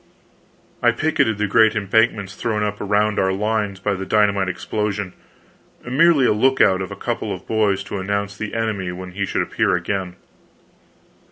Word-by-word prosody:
] - - -35 0.3
I 120 - +5
picketed 120 -5 0
the 105 - 0
great 110 +2 +4
embankments 105 -1 +1
thrown 105 0 -2
up 105 0 -3
around 105 +1 +1
our 95 0 +2
lines 105 0 -1
by 100 +2 -1
the 95 0 -4
dynamite 100 -1 +2
explosion 105 0 -3 0.7
merely 140 +2 +4
a - - +4
lookout 105 -5 +3
of 95 - -4
a - - -7
couple - - -3
of - - -6
boys 105 -3 +1
to 100 - -5
announce 100 +1 -2
the 105 +1 -5
enemy 105 -5 -2
when 90 +1 -8
he 100 +1 -3
should - - 0
appear - - 0
again. 90 0 -3
105 Hz, 170 wpm, -21 LUFS, 95-110 Hz, 0.7 s, I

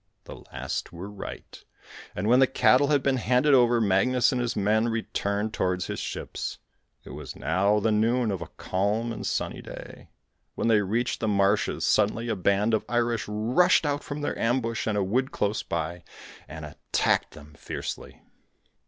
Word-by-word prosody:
The - - -10
last 65 +1 -4
were 90 +4 -8
right, 100 - -9 0.5
and 95 +3 -2
when 125 +3 +5
the 135 - +6
cattle 130 +1 +4
had 145 -2 +2
been 135 -1 +2
handed 125 +5 +3
over, 120 -2 +5
Magnus 115 +6 +3
and 125 -2 -1
his 120 -1 -2
men 110 +3 +2
returned 110 -2 -2
towards 90 -2 -1
his - - -4
ships. - - -5 0.5
It - - -11
was - - -8
now 100 +5 +1
the 110 +2 +1
noon 115 +2 +2
of 95 -3 -3
a 85 - -5
calm 105 +5 -1
and - - -5
sunny - - -2
day. - - -11 0.5
When - - 0
they 110 -2 +5
reached 115 +5 -1
the 110 - -1
marshes, 100 0 +1
suddenly 110 +3 +2
a 110 - 0
band 100 +4 +1
of 110 - +2
Irish 120 -1 0
rushed 115 +13 +3
out 145 0 -1
from 145 +1 -5
their 145 - -2
ambush 115 -1 0
in 110 - 0
a 100 - +1
wood 130 +8 0
close 105 +1 -1
by, 85 +1 -4 0.4
and 75 -1 -8
attacked 75 - -1
them 75 0 -13
fiercely. 75 - -7
110 Hz, 175 wpm, -26 LUFS, 100-120 Hz, 0.5 s, the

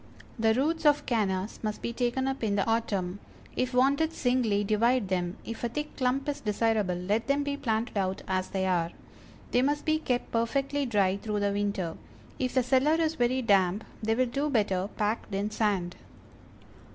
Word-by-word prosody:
The 220 0 +3
roots 315 +6 0
of 295 0 +4
Cannas 205 -4 -1
must 215 -1 -3
be 235 - -2
taken 250 +2 0
up 270 -2 -3
in 205 -2 +1
the 195 - +1
autumn. 205 -5 -1 0.4
If 255 0 0
wanted 280 +5 +3
singly, 245 -7 +1
divide 220 +1 +2
them, 180 +1 -1
if 230 +1 -6
a 235 - 0
thick 295 +6 -5
clump 260 +1 0
is 290 -1 -2
desirable 210 -3 +1
let 200 +6 -1
them 280 +1 +2
be 285 0 -2
planted 225 -4 -1
out 190 -1 -1
as 185 0 0
they 190 -1 -1
are. 175 -3 +1 0.6
They 245 - +3
must 290 +2 0
be 310 0 +2
kept 250 -5 -2
perfectly 275 +4 0
dry 195 -4 +2
through 210 0 -3
the 200 0 +1
winter; 200 -4 -2 0.4
if 255 0 -1
the 255 - +4
cellar 265 +5 +3
is 320 -1 +1
very 255 -1 +1
damp 195 -1 +3 0.2
they 220 +1 +1
will 255 +2 +3
do 275 +5 -1
better 200 -6 +1
packed 210 -1 -1
in 205 +2 -1
sand. 200 -5 0
225 Hz, 185 wpm, -28 LUFS, 200-260 Hz, 0.6 s, of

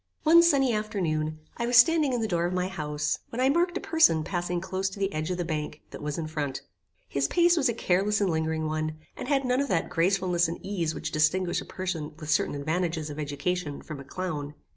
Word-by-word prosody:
One 330 +2 +7
sunny 275 -7 +4
afternoon, 160 -8 -1 0.2
I 235 - -1
was 245 0 +4
standing 300 +3 +6
in 245 -2 0
the 220 - 0
door 170 -3 0
of 180 - -3
my 180 0 0
house, 150 -5 -2
when 230 - -6
I 260 +1 +4
marked 345 +4 +2
a - - -2
person 315 - +4
passing 175 +1 -2
close 190 +1 -2
to 195 - -10
the 195 0 -1
edge 155 +2 -2
of 180 - -1
the 175 - -2
bank 155 -2 -4
that - - -8
was 150 0 -3
in 165 - -2
front. 150 -4 -3 0.4
His 140 0 0
pace 345 0 +4
was 275 -6 +2
a - - +1
careless 200 +1 +1
and 200 -3 +1
lingering 160 0 -1
one, 155 0 -2 0.2
and - - -6
had 275 -1 +1
none 250 +2 +2
of 280 - -1
that 175 -8 0
gracefulness 180 0 +2
and 165 - -4
ease 170 -6 -2
which - - -4
distinguish 175 +4 +1
a - - -9
person 160 -5 -4
with 155 -1 -4
certain - - +1
advantages 160 +1 -2
of 145 - -7
education 145 +2 -3
from 155 -2 -7
a - - -8
clown. 150 -2 -5
175 Hz, 230 wpm, -27 LUFS, 155-215 Hz, 0.4 s, One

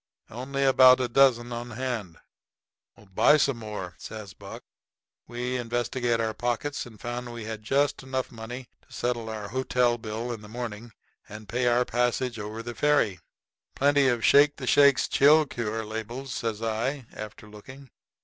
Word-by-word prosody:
"Only 135 +4 -3
about 130 -1 +7
a 125 - 0
dozen 120 -2 +3
on 120 +1 -5
hand." 115 -8 -4 1.0
"Buy 150 +10 +5
some 140 -4 +1
more," 105 -5 -6
says 105 -3 -8
Buck. - - -10 0.6
We 125 +1 -3
investigated 120 0 -1
our 110 -1 -1
pockets 120 +5 -2
and 110 -3 -15
found 120 0 -5
we 120 -1 -7
had 110 -1 -6
just 140 +6 +1
enough 130 -1 -3
money 120 +2 -8
to - - -30
settle 120 -2 -2
our 105 -2 -6
hotel 125 -1 +1
bill 115 +2 -4
in 110 - -8
the 105 - -12
morning 115 -1 -6 0.4
and 105 0 -10
pay 125 +4 0
our 120 +1 +3
passage 120 0 -1
over 105 +2 -6
the 120 +1 -6
ferry. 115 -8 +2 0.6
"Plenty 140 0 +3
of 120 -2 +1
the - - -8
'Shake 145 +1 +6
the 130 - -7
Shakes 140 +1 +5
Chill 150 +3 +5
Cure' 115 -4 -4
labels," 115 +5 -6
says 115 -1 -3
I, 120 +5 -2
after 105 0 -9
looking. 130 +5 -13
120 Hz, 165 wpm, -27 LUFS, 110-130 Hz, 1.0 s, about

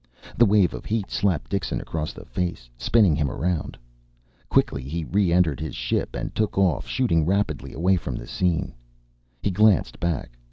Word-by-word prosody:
The 120 - +5
wave 100 -3 +4
of - - -7
heat 105 -3 -2
slapped 95 -7 0
Dixon 100 -3 -1
across 80 -1 -4
the - - -12
face, 85 -3 -3
spinning 85 - +3
him 75 -2 0
around. 85 +4 -2 0.7
Quickly 70 - +2
he 80 +6 -4
re 95 +2 +1
entered 85 -5 +3
his 80 -3 -5
ship - - -2
and - - -4
took 110 -2 -1
off, 95 -6 +2
shooting 100 -12 +2
rapidly 95 -3 -1
away 90 +3 +2
from 70 -7 -4
the - - -6
scene. 90 -3 -1 0.7
He 100 - +1
glanced 105 -1 +3
back. 85 -7 -2
85 Hz, 170 wpm, -24 LUFS, 75-100 Hz, 0.7 s, The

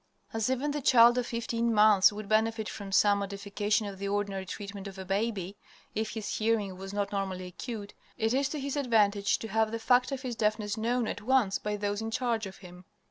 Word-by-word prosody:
As 225 +1 0
even 260 +3 0
the 295 0 -3
child 240 -1 +6
of 240 - -2
fifteen 235 0 -1
months 210 -3 +6
would 210 0 -7
benefit 220 +1 +1
from 200 -2 -7
some 205 0 +4
modifications 205 +2 -1
of 195 - -12
the 200 - -3
ordinary 200 -1 -2
treatment 200 0 -7
of 195 -1 -9
a 190 - -7
baby, 200 -1 -2 0.4
if 220 0 -3
his 220 -2 -3
hearing 215 -4 0
was 195 +1 -8
not 200 0 -2
normally 190 -2 -3
acute, 205 +3 -7 0.2
it 225 -1 +1
is 270 +1 +1
to 300 - -4
his 280 +1 -3
advantage 210 -7 +2
to 225 - -6
have 220 +1 +2
the 230 - -2
fact 250 +3 +3
of 270 -1 -4
his 250 -2 -3
deafness 210 -1 0
known 235 +1 0
at - - -4
once 235 -4 +2
by 210 0 -2
those 205 +1 -2
in 225 - -3
charge 225 -2 -1
of 190 - -11
him. 180 0 -12
215 Hz, 215 wpm, -29 LUFS, 200-230 Hz, 0.4 s, child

